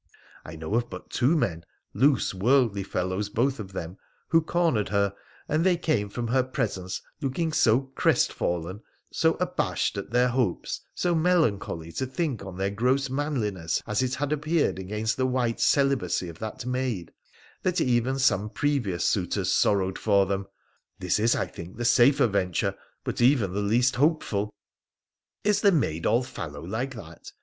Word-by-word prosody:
I 80 - -9
know 80 +5 -5
of 120 +1 +1
but - - -9
two 145 +7 +2
men 85 - -1 0.2
— - - -52
loose, 135 -6 +2
worldly 115 +1 +2
fellows 95 +1 -2
both 130 +5 0
of 95 -3 -7
them 90 0 -6
— - - -40
who 165 -1 +5
cornered 160 - +1
her, 100 0 +1 0.3
and 155 +2 +1
they 180 -1 +3
came 120 -12 0
from 120 +2 -4
her 130 +2 +3
presence 95 -7 -3 0.2
looking 155 +4 -1
so 120 -3 +4
crestfallen, 90 -1 0 0.3
so - - +2
abashed - - -1
at 100 - -7
their 125 +2 +3
hopes, 120 -8 -1
so 175 -1 +1
melancholy 155 - +1
to 130 +10 -3
think 130 - -2
on 95 -2 -8
their 95 +1 -1
gross 130 +6 +1
manliness 110 - -1
as 105 +2 0
it 130 0 0
had 145 +1 -2
appeared 155 - 0
against 105 +4 -2
the 130 0 +1
white 125 -1 0
celibacy 135 -12 +2
of 85 - -11
that 110 +3 -6
maid, 125 -8 -2 0.5
that 180 -1 0
even 125 +1 +1
some 110 -6 +2
previous 120 - -1
suitors - - 0
sorrowed 95 -2 +2
for 100 -2 +3
them. 100 0 -2 0.5
This 90 +2 0
is, 115 +2 +3
I - - 0
think, 85 +4 -10
the 120 - -3
safer 125 +3 +5
venture, 95 -5 0 0.3
but - - -3
even 120 -7 +3
the 100 - -1
least 120 +5 +2
hopeful.' 130 -9 +1 0.5
' - - -59
Is 210 -1 +2
the 200 - +5
maid 85 - 0
all 120 +2 +3
fallow 75 -10 -7
like 120 +8 -3
that 85 -7 -11
115 Hz, 170 wpm, -26 LUFS, 95-135 Hz, 0.5 s, who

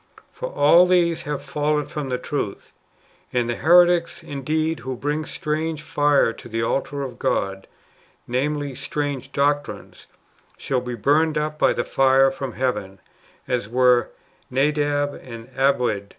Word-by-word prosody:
For - - -6
all 180 - +5
these 170 -2 +2
have 145 - -3
fallen 150 0 -1
from 150 -3 -5
the 125 - -1
truth. 125 -5 -5 0.6
And 120 -1 0
the 120 - -1
heretics, 175 0 +4
indeed, 155 +3 -2
who 130 -1 -5
bring 150 +3 -2
strange 155 0 -3
fire 145 -6 +2
to 120 - -12
the 115 0 -2
altar 140 +4 -1
of 125 -3 -7
God 95 0 -1 0.3
— - - -32 0.3
namely, 145 +3 -1
strange 145 0 -4
doctrines 145 +1 -2 0.3
— - - -34
shall 130 -2 -1
be 125 -1 -5
burned 150 +7 +2
up 150 0 -2
by - - +4
the - - -1
fire 135 0 +4
from 135 -2 -6
heaven, 105 -7 -2 0.5
as 120 -4 -2
were 125 0 +3 0.4
Nadab 145 +1 +1
and 115 -1 -10
Abiud. 125 -7 +1
140 Hz, 150 wpm, -22 LUFS, 125-150 Hz, 0.6 s, all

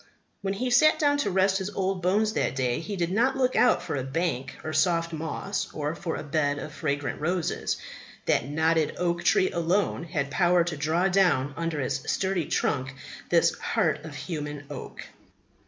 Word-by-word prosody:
When 195 0 -2
he 250 +5 -2
sat 310 +6 +6
down 290 -1 +2
to 210 - +1
rest 190 +1 +2
his 190 +1 -3
old 190 -2 -2
bones 210 +4 +2
that - - 0
day 125 -2 0
he 200 +5 -5
did 175 -2 -1
not 250 +7 +2
look 255 -1 +1
out 245 - +4
for - - -3
a 135 - -2
bank 135 -2 -2
of 155 - -4
soft 170 -2 +2
moss 160 +5 -3
or 150 0 -2
for 170 -1 -4
a - - -5
bed 145 -1 0
of 150 +1 -6
fragrant 145 -2 -2
roses; 175 +1 -1 0.5
that 130 - +1
knotted 160 +1 +1
oak 175 -1 0
tree 185 - +3
alone 170 +1 0
had 150 -4 -2
power 175 +1 +4
to 170 -1 -3
draw 160 +5 +1
down 175 -8 +2
under 165 -1 -2
its 135 0 -1
sturdy 190 -4 0
trunk 130 +1 -1 0.3
this 170 -1 +4
heart 160 -9 0
of 155 -2 -8
human 150 -3 -5
oak. 140 - -7
170 Hz, 185 wpm, -27 LUFS, 150-190 Hz, 0.5 s, sat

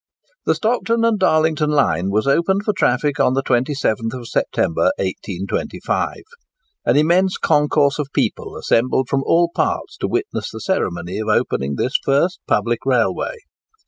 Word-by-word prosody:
The - - +3
Stockton 230 0 0
and 225 -3 +2
Darlington 155 -3 +2
line 95 - +1
was 105 +2 0
opened 170 +8 +2
for 210 - 0
traffic 140 +1 +1
on 125 - +3
the 135 - 0
27th 125 -2 -1
September, 85 -5 0
1825. 95 0 -3 0.7
An - - +3
immense 175 +5 +3
concourse 145 -1 +2
of 150 - -1
people - - -2
assembled 130 +2 +1
from 140 -1 +1
all 170 +3 +2
parts - - -2
to - - -2
witness 390 +3 -2
the - - -8
ceremony 90 - -2
of 110 - -4
opening 70 -9 0
this 125 - -2
first 145 +7 +1
public - - +1
railway. - - 0
140 Hz, 145 wpm, -19 LUFS, 115-170 Hz, 0.7 s, The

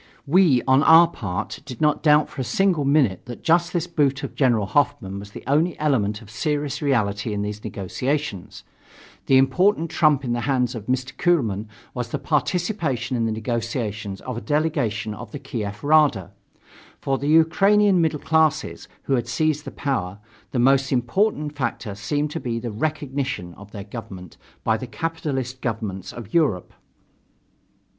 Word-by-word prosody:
We, 150 -4 +4
on 130 +1 +5
our 165 +2 +8
part, 100 - -5
did 130 -5 -9
not 150 -1 +2
doubt 150 -1 +4
for 135 - -6
a - - -1
single 180 0 +1
minute 135 - +2
that 120 0 -9
just 170 +1 +3
this 175 -2 -1
boot 145 -4 0
of 140 - -5
General 120 -7 +2
Hoffmann 120 -5 0
was 100 0 -9
the - - -10
only 155 +5 +1
element 110 -8 0
of 105 - -14
serious 145 +5 -2
reality 110 -7 0
in 100 0 -2
these 105 0 -5
negotiations. 105 -2 -3 0.6
The 135 - +6
important 165 +6 +2
trump 150 -3 +3
in 120 - -1
the 120 - -1
hands 125 -3 +1
of 110 -3 -8
Mr. 130 +1 -2
Kuehlmann 115 - +1 0.3
was 125 -2 -4
the - - -2
participation 150 - -1
in 115 -1 0
the - - -1
negotiations 110 -3 -3
of 125 -2 -5
a - - -4
delegation 120 -9 -1
of 110 0 -9
the - - -5
Kiev 105 -7 -5
Rada. 145 - +3 0.7
For 135 -1 -1
the 140 - -3
Ukrainian 190 +5 +4
middle 160 -2 +1
classes, 160 -1 +1 0.2
who 135 - -1
had 120 -2 0
seized 150 +4 0
the - - -5
power, 100 -10 -3 0.3
the - - -4
most 135 +2 +3
important 150 - 0
factor 115 -6 -3
seemed 145 +10 -2
to 165 - -3
be 120 -5 -3
the 115 0 -4
"recognition" 135 - -3
of 100 +3 -13
their 100 -2 -8
government 95 -5 -9 0.3
by 110 0 +2
the 130 - -7
capitalist 135 -3 -4
governments 105 -5 -4
of 115 -4 -10
Europe. 145 - +1
130 Hz, 165 wpm, -23 LUFS, 110-150 Hz, 0.7 s, our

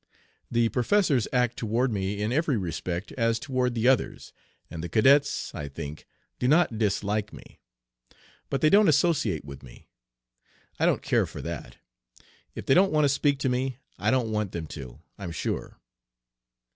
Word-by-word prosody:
The 120 -1 +2
professors 135 - +2
act 125 -2 +1
toward 120 +3 0
me 100 0 -2
in 110 - -1
every 145 -1 +1
respect 85 +1 -4
as 115 -2 +1
toward 130 -2 -1
the 115 +1 +1
others, 130 -3 +1 0.3
and 80 - -7
the 85 - -4
cadets, 140 - +3
I 75 - -5
think, 75 +1 -8 0.3
do 125 - +1
not 145 -6 +3
dislike 105 0 0
me. - - -14 0.9
But 135 - -1
they 155 - +4
don't 205 0 +6
associate 140 - +2
with 70 -1 -9
me. 60 -3 -15 0.9
I - - +3
don't - - +1
care - - +2
for - - -8
that. - - -6 0.8
If - - -6
they - - +4
don't 190 +4 +5
want 150 -1 +3
to - - +3
speak 140 +1 +2
to 130 - +1
me 125 0 -1 0.2
I - - +1
don't 125 -4 +1
want 105 -3 -2
them 85 -2 -4
to, 65 -5 -9 0.2
I'm 95 -4 -5
sure.' 80 - -4
115 Hz, 170 wpm, -27 LUFS, 95-135 Hz, 0.9 s, don't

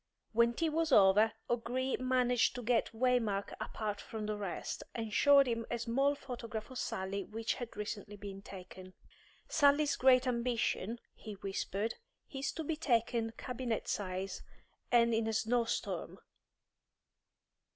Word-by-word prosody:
When 235 +1 +4
tea 325 +4 +1
was 320 0 0
over, 210 0 +6
O'Gree 245 +2 -1
managed 250 -2 +2
to 245 - -5
get 235 0 +2
Waymark 225 -4 +1
apart 210 -2 -3
from 220 -1 -5
the 215 0 -1
rest, 200 -4 -4
and 225 -2 -4
showed 280 +2 +6
him 230 -2 -1
a 240 - -1
small 270 +5 +1
photograph 230 -4 -6
of 255 - -5
Sally 195 0 -2
which 225 +3 -2
had 240 -4 -7
recently 210 0 -5
been 195 -1 -8
taken. 185 -1 -11 0.5
"Sally's 290 -1 +4
great 255 0 +5
ambition," 235 -3 0 0.2
he 215 - -9
whispered, 195 +2 -3 0.4
"is 270 0 -2
to 320 - -4
be 310 +1 -1
taken 235 -5 +1
cabinet 245 -2 -3
size, 185 -1 -3 0.5
and 235 -1 +5
in 225 0 +1
a 225 - -1
snow 230 +2 +2
storm. - - -3
230 Hz, 140 wpm, -34 LUFS, 210-255 Hz, 0.5 s, over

